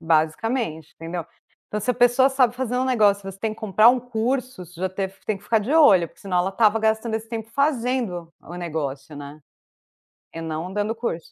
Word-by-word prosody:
basicamente, 160 - 0
entendeu. 165 0 -5 0.4
Então 210 - -3
se 250 - 0
a - - 0
pessoa 245 +2 +4
sabe 255 -3 +2
fazer 250 -1 -2
um 255 - +1
negócio, 210 -6 +3
você 195 - -14
tem 220 +1 -2
que - - -19
comprar 215 +1 +5
um 250 +1 +4
curso, 245 -2 -2
você 175 +1 -14
já 190 - 0
teve 190 +1 -4
você - - -28
já - - -30
tem 215 -2 -1
que - - -21
ficar 225 - +2
de 245 +9 -3
olho, 195 - +6
porque - - -24
senão 185 -2 -1
ela 180 +2 +1
estava 220 +1 +3
gastando 220 +1 0
esse 225 0 -4
tempo 225 -1 -5
fazendo 245 - -1
o 175 - -11
negócio, 150 -4 -5
né, 145 +1 -9 0.9
e 165 - -6
não 160 +3 -4
dando 210 +2 -1
curso. 195 -8 -4
210 Hz, 220 wpm, -23 LUFS, 175-245 Hz, 0.9 s, olho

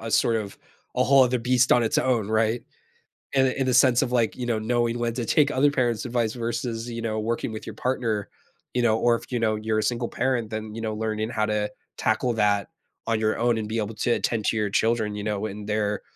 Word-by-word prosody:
a 115 - -5
sort 115 +1 +3
of 105 -3 -5 0.4
a - - +3
whole 135 -1 +6
other 125 0 +2
beast 125 +1 +2
on 120 - +5
its 110 - +1
own, 120 -6 +1
right? 110 +2 +1 0.7
In 135 -1 +4
the 130 - -1
in 135 - +1
the 130 - +1
sense 125 -1 +5
of 130 -3 -1
like, 120 -3 +1
you 125 - -4
know, 115 -2 0
knowing 120 +1 0
when 120 -1 -1
to 120 0 -3
take 145 +5 +3
other 145 +1 +3
parents' 120 -5 0
advice 120 -3 0
versus, 115 -1 -3
you 115 0 -5
know, 110 -1 -2
working 115 +1 -2
with 110 - -7
your 110 - -7
partner, 115 -4 -1 0.4
you 125 - +1
know, 110 -2 +3
or 120 +1 +3
if, 115 - -8
you 120 - 0
know, 110 -1 +1
you're 110 0 -1
a - - 0
single 120 +1 -1
parent, 125 -4 -1
then, 110 -1 -5
you 115 - -5
know, 110 -1 -2
learning 110 0 -2
how 110 -2 0
to 105 -1 -1 0.3
tackle 125 - +1
that 105 -3 +1 0.4
on 115 -1 +1
your 110 0 +1
own 120 0 +2
and 110 -1 -3
be 110 +2 -3
able 105 0 -3
to 120 - 0
attend 115 -2 0
to - - +1
your 105 -1 0
children, 110 0 +1
you 105 - -5
know, 105 0 -2
in 105 0 -7
their 105 -1 -1
115 Hz, 250 wpm, -25 LUFS, 110-120 Hz, 0.7 s, whole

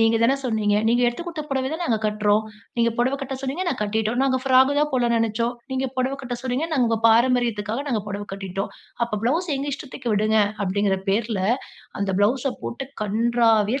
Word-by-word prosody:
"நீங்க 225 0 +4
தான 245 +4 +4
சொன்னீங்க. 215 -4 +1
நீங்க 240 +1 +3
எடுத்து 240 +7 -1
குடுத்த 330 -3 -4
புடவையதான் 275 +5 -1
நாங்க 230 -8 +1
கட்றோம். 210 0 +2 0.3
நீங்க 235 0 +3
பொடவ 255 +3 +2
கட்ட 270 0 -4
சொன்னீங்க. 275 +7 -2
நாங்க 265 - -2
கட்டிட்டோம். 220 +3 0
நாங்க 260 -1 +2
ஃபிராக் 265 +1 +5
தான் 300 0 +2
போடலாம்ன்னு 240 -2 +2
நெனைச்சோம். 230 +2 0 0.2
நீங்க 265 0 0
பொடவை 260 +2 0
கட்ட 245 -2 -4
சொன்னீங்க. 260 +4 -1
நாங்க 260 -6 +3
உங்க 225 -1 +1
பாரம்பரியத்துக்காக 235 0 +2
நாங்க 235 -5 0
பொடவை 205 0 -5
கட்டிட்டோம். 195 0 -4 0.3
அப்ப 215 -3 -3
ப்ளவுஸ் 325 +9 +1
எங்க 280 +2 -3
இஷ்டத்துக்கு 260 -5 -5
விடுங்க". 215 +1 +2 0.3
அப்படிங்கிற 195 0 +1
பேர்ல 215 0 0 0.6
அந்த 195 -1 0
ப்ளவுஸ்ஸ 250 +6 +2
போட்டு 265 +3 -5 0.2
கன்றாவியா 225 +2 +2
235 Hz, 180 wpm, -23 LUFS, 215-265 Hz, 0.6 s, ஃபிராக்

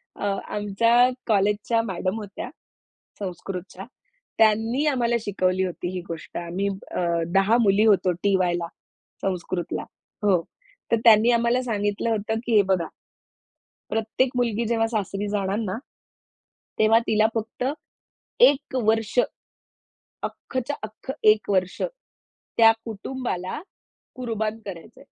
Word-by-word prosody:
अ, - - -4 0.3
आमच्या 230 +5 +4 0.2
कॉलेजच्या 210 +2 +2
मॅडम 190 0 -2
होत्या 205 -2 -7 0.7
संस्कृतच्या 190 0 -6 0.5
त्यांनी 225 +6 +3
आम्हाला 240 -4 +2
शिकवली 190 -2 0
होती 175 0 -4
ही 180 - -3
गोष्ट 165 -1 -7
आम्ही 175 +4 -2 0.2
अ, - - -2 0.4
10 200 +5 +5
मुली 210 0 +4
होतो 195 -3 +4
टी. 195 +3 +1
वायला, 175 -2 0 0.5
संस्कृतला 180 -2 -2 0.4
हो. 185 -4 +4 0.5
तर 230 - +5
त्यांनी 225 +1 +7
आम्हाला 235 +1 +2
सांगितलं 205 -1 -1
होतं, 220 +1 -1
की 230 -2 +1
हे 205 - +8
बघा 170 -3 -1 1.0
प्रत्येक 225 +4 0
मुलगी 235 -1 +1
जेव्हा 225 -1 +2
सासरी 205 -2 -2
जाणार 200 -1 -1
ना, 205 -1 -2 1.0
तेव्हा 220 +1 +6
तिला 215 0 +4
फक्त 225 +2 -3 0.8
1 285 - +4
वर्ष, 220 +1 +1 1.1
अख्खच्या 260 +2 -4
अख्ख 220 +5 -8
1 215 -1 +4
वर्ष 185 -2 0 0.8
त्या 225 -1 +8
कुटुंबाला 225 0 -4 0.6
कुर्बान 220 -3 -2
करायचंय. 175 -4 -9
215 Hz, 115 wpm, -24 LUFS, 195-230 Hz, 1.1 s, हे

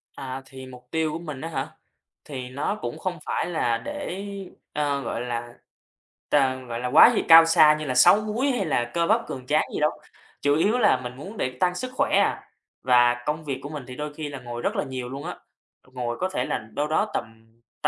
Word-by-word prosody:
À, 135 -1 -6
thì 130 0 -11
mục 125 -1 -13
tiêu 160 -1 0
của 160 - -4
mình 150 -6 -7
á 165 - -4
hả? - - -3 0.6
Thì 130 -4 -6
nó 140 +9 -2
cũng 120 - -4
không 180 -3 -3
phải - - -1
là 160 -9 0
để, 180 +10 -5 0.5
ơ, 145 -2 0
gọi 115 -2 -4
là, 120 -1 -4 0.8
t - - -11 0.3
gọi 115 -1 -4
là 125 - -2
quá 155 - +8
gì - - +2
cao 165 0 +10
xa 165 -2 +6
như 155 - -4
là 130 -3 -2
6 195 +11 +7
múi 230 +6 0
hay 235 -7 -1
là 120 -5 0
cơ 170 -1 +1
bắp 225 +2 +2
cường 130 -2 -7
tráng 150 +1 +3
gì - - -2
đâu, 150 +1 +3 0.5
chủ 145 0 +3
yếu 205 +10 +2
là 205 - +4
mình 125 0 -6
muốn 195 +11 -9
để 130 0 -2
tăng 180 -1 +2
sức 255 +6 -4
khỏe - - +1
à. - - +1 0.4
Và 120 -1 +5
công 155 +1 -2
việc 135 -3 -4
của 145 - -6
mình 150 -3 -6
thì 125 - -8
đôi 150 +2 -5
khi 150 -1 -5
là 140 -2 -7
ngồi 120 -1 -7
rất - - -1
là - - 0
nhiều 130 -2 -5
luôn 140 +2 -6
á, - - -5 0.6
ngồi 120 -2 -3
có 185 - 0
thể 125 -9 -2
là - - -1 0.2
đâu 150 +1 -1
đó 205 +7 0
tầm 110 -1 -5 0.4
t - - +4
145 Hz, 235 wpm, -25 LUFS, 125-165 Hz, 0.8 s, cao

